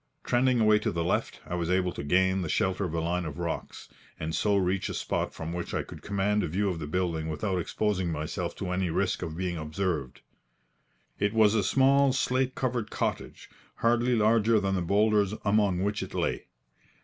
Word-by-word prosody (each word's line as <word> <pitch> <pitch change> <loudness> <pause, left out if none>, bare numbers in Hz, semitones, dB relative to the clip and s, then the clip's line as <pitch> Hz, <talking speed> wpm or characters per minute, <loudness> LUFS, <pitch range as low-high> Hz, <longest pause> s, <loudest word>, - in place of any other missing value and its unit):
Trending 125 0 +2
away 110 -1 +5
to - - -1
the 85 -1 -1
left, 85 - -1
I - - -6
was 85 -1 -1
able 90 0 +2
to - - -6
gain 95 +5 +2
the 85 - -3
shelter 95 +4 0
of 85 -2 -4
a - - 0
line 85 +2 -1
of 80 -2 -6
rocks, 85 -1 -5 0.3
and 80 0 -3
so 100 +3 +2
reach 95 0 0
a - - -4
spot - - -2
from 80 +1 -6
which 85 0 -4
I - - 0
could - - -11
command 100 +1 0
a - - -1
view 100 +6 0
of 90 -3 -3
the 75 - -5
building 80 -1 -1
without 90 +4 -1
exposing 95 0 -1
myself 75 0 -3
to 90 -2 -4
any 90 0 0
risk 80 - 0
of 80 0 -5
being 90 -2 -2
observed. 75 -3 -3 1.0
It 100 +1 +1
was 110 -2 +5
a 110 -3 +2
small, 135 +5 +4
slate 130 0 0
covered 120 -4 -2
cottage, - - -3 0.3
hardly 120 +1 +2
larger 110 0 +4
than 95 -1 -1
the 95 - 0
boulders 105 +2 +2
among 100 -3 +2
which 105 +1 -1
it - - -7
lay. - - -1
95 Hz, 200 wpm, -28 LUFS, 85-105 Hz, 1.0 s, away